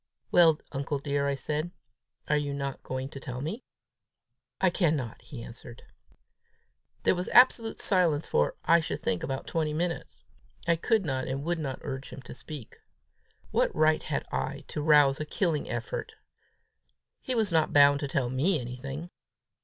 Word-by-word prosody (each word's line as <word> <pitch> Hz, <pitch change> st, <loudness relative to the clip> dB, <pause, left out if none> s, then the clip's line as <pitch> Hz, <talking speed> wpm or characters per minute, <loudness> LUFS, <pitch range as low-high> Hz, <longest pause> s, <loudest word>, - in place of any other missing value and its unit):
"Well, 165 Hz, -3 st, +6 dB
uncle 140 Hz, +1 st, -2 dB
dear," 140 Hz, 0 st, -1 dB
I 140 Hz, -, +1 dB
said, 150 Hz, +4 st, -2 dB, 0.6 s
"are 150 Hz, -, +2 dB
you 145 Hz, -1 st, -1 dB
not 140 Hz, -1 st, -4 dB
going 130 Hz, +1 st, -4 dB
to 135 Hz, -, -8 dB
tell 125 Hz, -2 st, -6 dB
me?" 180 Hz, -, -4 dB, 1.0 s
"I 190 Hz, -2 st, +3 dB
cannot," 150 Hz, -, 0 dB
he 125 Hz, -6 st, -9 dB
answered. 115 Hz, 0 st, -11 dB, 1.2 s
There -, -, +4 dB
was 180 Hz, +1 st, -3 dB
absolute 240 Hz, -2 st, +5 dB
silence 170 Hz, -6 st, +2 dB
for, 75 Hz, -, +1 dB
I 170 Hz, +1 st, +6 dB
should 155 Hz, -, -3 dB
think, 90 Hz, -, -1 dB
about 135 Hz, 0 st, -3 dB
twenty 155 Hz, -2 st, -1 dB
minutes. 165 Hz, -, -3 dB, 0.4 s
I 170 Hz, -, +4 dB
could 215 Hz, +4 st, +1 dB
not 130 Hz, -3 st, -2 dB
and 135 Hz, +1 st, -3 dB
would 170 Hz, +1 st, -1 dB
not 135 Hz, -4 st, -3 dB
urge 135 Hz, 0 st, -5 dB
him 135 Hz, -, -10 dB
to -, -, -9 dB
speak. 145 Hz, -3 st, -9 dB, 0.7 s
What -, -, +1 dB
right 155 Hz, 0 st, +3 dB
had -, -, -3 dB
I 65 Hz, +1 st, -2 dB
to 150 Hz, -, -3 dB
rouse 145 Hz, -2 st, +5 dB
a -, -, -1 dB
killing 160 Hz, -1 st, -1 dB
effort! -, -, -4 dB, 1.1 s
He 255 Hz, -, -2 dB
was 220 Hz, -4 st, +1 dB
not 160 Hz, -2 st, +2 dB
bound 145 Hz, -1 st, +6 dB
to 145 Hz, -, -2 dB
tell 130 Hz, -3 st, -1 dB
me 155 Hz, +7 st, +2 dB
anything! 135 Hz, +7 st, -6 dB
145 Hz, 165 wpm, -28 LUFS, 135-170 Hz, 1.2 s, Well